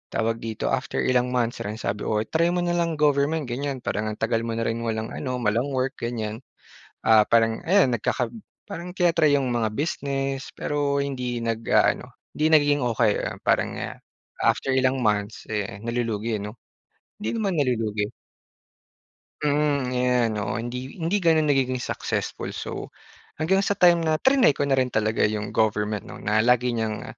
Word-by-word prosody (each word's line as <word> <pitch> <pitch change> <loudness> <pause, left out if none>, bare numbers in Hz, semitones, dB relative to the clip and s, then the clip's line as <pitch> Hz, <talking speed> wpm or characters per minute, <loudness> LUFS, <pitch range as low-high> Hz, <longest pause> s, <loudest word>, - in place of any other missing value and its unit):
tawag 115 0 0
dito, 110 -1 -3
after 135 0 -1
ilang 125 0 +1
months 120 -1 0
lang 105 +1 -4
sabi, 105 -2 -3
"Oh, 110 0 +1
try 160 +9 +1
mo 175 - 0
na 175 - 0
lang 170 -1 0
government 150 +1 +2
ganyan 135 +1 -3
parang 110 +1 -2
ang 105 0 -4
tagal 115 +1 +1
mo 115 -1 -2
na 115 - -1
rin 115 +1 -1
walang 110 -1 -2
ano, 130 -2 -3
walang 115 +4 +1
work," 130 0 -1
ganyan. 110 -2 -3 0.6
Ah, 110 -1 +6
parang 115 -1 +3
ayan 185 -7 +5
nagkaka 115 - -1 0.4
parang 180 -2 -6
tina-try 170 -5 +3
yung 135 -3 +2
mga 115 -3 0
business 135 -1 -2
pero 145 -1 -1
hindi 125 -4 -3
nag-aano, 115 -1 +1 0.3
hindi 155 - +1
nagiging 145 -2 +4
okey, 115 -2 +2
ayan - - -4
parang - - +1 0.7
after - - +1
ilang 130 0 +2
months 105 -1 -1
eh, 100 -1 -3
nalulugi 115 -2 -2
'no, 105 +1 -6 0.7
hindi 210 - -3
naman 195 -8 0
nalulugi. 110 -6 0 1.3
Mm, 145 -3 +1
ayan. 125 -2 +2
Oo 105 - -2
hindi 125 +3 -5
hindi 165 +5 +1
gano'n 160 -5 +3
nagiging 130 -2 +1
successful. - - -3
So - - -6 0.4
hanggang 180 +5 +2
sa 200 0 0
time 175 -3 +5
na 160 -1 +1
trinay 265 - +4
ko - - 0
na 135 -1 +2
rin 130 -1 +2
talaga 110 0 0
yung 105 -1 -4
government 105 -1 0
'no - - -9
na 110 +1 +2
lagi 125 +1 +3
niyang 110 0 -2
125 Hz, 165 wpm, -24 LUFS, 110-145 Hz, 1.3 s, Ah